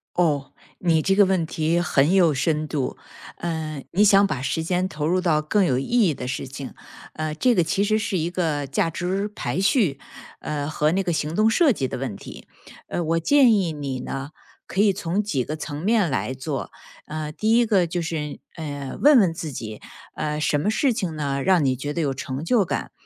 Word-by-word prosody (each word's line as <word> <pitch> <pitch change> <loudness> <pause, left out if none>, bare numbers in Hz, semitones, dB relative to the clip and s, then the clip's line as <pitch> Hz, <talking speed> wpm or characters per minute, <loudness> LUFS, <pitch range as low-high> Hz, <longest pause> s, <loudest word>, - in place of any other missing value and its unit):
哦。 150 -6 +1 0.3
你 165 -3 +3
这 195 - +2
个 200 +1 +6
问 185 -3 +1
题 160 +1 0
很 150 -1 +2
有 175 -5 +5
深 150 +2 0
度， 145 -3 -3 0.4
呃， 155 -4 -4
你 200 +4 +3
想 200 0 +6
把 150 -10 -2
时 160 +4 -1
间 180 +2 0
投 150 -5 -4
入 180 +3 +2
到 165 -4 +2
更 190 +6 +2
有 130 -7 +1
意 135 - -2 0.2
义 160 - +1
的 125 - -6
事 125 +1 -4
情。 135 0 -8 0.4
呃， 155 -1 -3
这 245 +10 +3
个 175 - +3
其 195 +4 +1
实 215 +1 +2
是 210 -3 -1
一 165 0 -1
个 160 -5 -1
价 140 +4 0
值 185 +5 -2
排 180 -8 -4
序， 190 - +2 0.4
呃， 145 -1 -3
和 155 0 +1
那 195 +1 +1
个 175 - -1
行 155 0 -2
动 215 +3 +4
设 280 +4 +4
计 135 - -2
的 - - -4
问 130 -5 -4
题， - - -11 0.4
呃， 175 - -2
我 165 +1 +1
建 255 - +5
议 185 -6 +1
你 140 -3 -4
呢， 135 +2 -5 0.4
可 190 - -4
以 205 -1 +5
从 185 +1 -1
几 195 -12 -1
个 155 +5 -5
层 150 -1 -6
面 210 -3 +2
来 130 -1 -1
做。 135 +1 -5 0.4
呃， 155 0 -4
第 215 +7 0
一 240 - +4
个 200 -5 +3
就 170 +1 -3
是， 155 -3 -4 0.2
呃， 145 -4 -6
问 290 -2 +7
问 185 -6 +3
自 160 -2 -5
己， 110 -4 -7 0.3
呃， 150 0 -2
什 150 0 +1
么 200 - 0
事 255 +3 +2
情 190 -8 -3
呢， 140 -2 -2
让 185 -4 +4
你 130 -1 +2
觉 145 +4 -4
得 170 - -3
有 140 -3 0
成 130 0 -5
就 225 +3 +3
感。 175 - -3
160 Hz, 230 characters per minute, -23 LUFS, 145-190 Hz, 0.4 s, 问